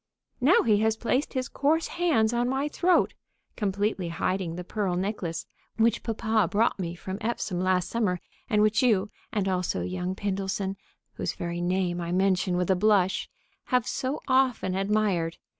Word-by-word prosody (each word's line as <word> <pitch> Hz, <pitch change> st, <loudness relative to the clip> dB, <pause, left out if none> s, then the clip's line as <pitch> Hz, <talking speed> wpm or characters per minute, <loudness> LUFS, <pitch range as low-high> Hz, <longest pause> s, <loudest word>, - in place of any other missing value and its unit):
Now 290 Hz, +9 st, +5 dB
he 215 Hz, -3 st, +4 dB
has 220 Hz, 0 st, +2 dB
placed 250 Hz, +6 st, 0 dB
his 255 Hz, -2 st, -1 dB
coarse 315 Hz, +4 st, +1 dB
hands 290 Hz, -11 st, +2 dB
on 240 Hz, +1 st, +1 dB
my 270 Hz, +2 st, 0 dB
throat, 355 Hz, +4 st, +2 dB, 0.4 s
completely 200 Hz, -2 st, -1 dB
hiding 170 Hz, 0 st, -1 dB
the 180 Hz, -, -5 dB
pearl 190 Hz, -1 st, -2 dB
necklace 185 Hz, -3 st, -3 dB, 0.3 s
which 225 Hz, +1 st, +3 dB
papa 220 Hz, -3 st, +1 dB
brought 215 Hz, 0 st, +1 dB
me 170 Hz, -2 st, -3 dB
from 190 Hz, +3 st, -6 dB
Epsom 210 Hz, -5 st, -2 dB
last 185 Hz, -1 st, +2 dB
summer, 200 Hz, -5 st, 0 dB, 0.3 s
and 210 Hz, -3 st, +3 dB
which 215 Hz, +3 st, +3 dB
you, 215 Hz, -5 st, +2 dB, 0.2 s
and 200 Hz, -3 st, 0 dB
also 180 Hz, -, 0 dB
young 180 Hz, -, -3 dB
Pindleson 195 Hz, 0 st, -2 dB, 0.4 s
(whose -, -, -3 dB
very 170 Hz, 0 st, -4 dB
name 175 Hz, 0 st, 0 dB
I 170 Hz, 0 st, -3 dB
mention 185 Hz, -1 st, +2 dB
with 180 Hz, +1 st, +1 dB
a -, -, +4 dB
blush), 195 Hz, -1 st, +2 dB, 0.4 s
have 250 Hz, -3 st, +1 dB
so 265 Hz, +3 st, -2 dB
often 260 Hz, -8 st, +2 dB
admired. 195 Hz, -4 st, 0 dB
200 Hz, 160 wpm, -27 LUFS, 180-230 Hz, 0.4 s, Now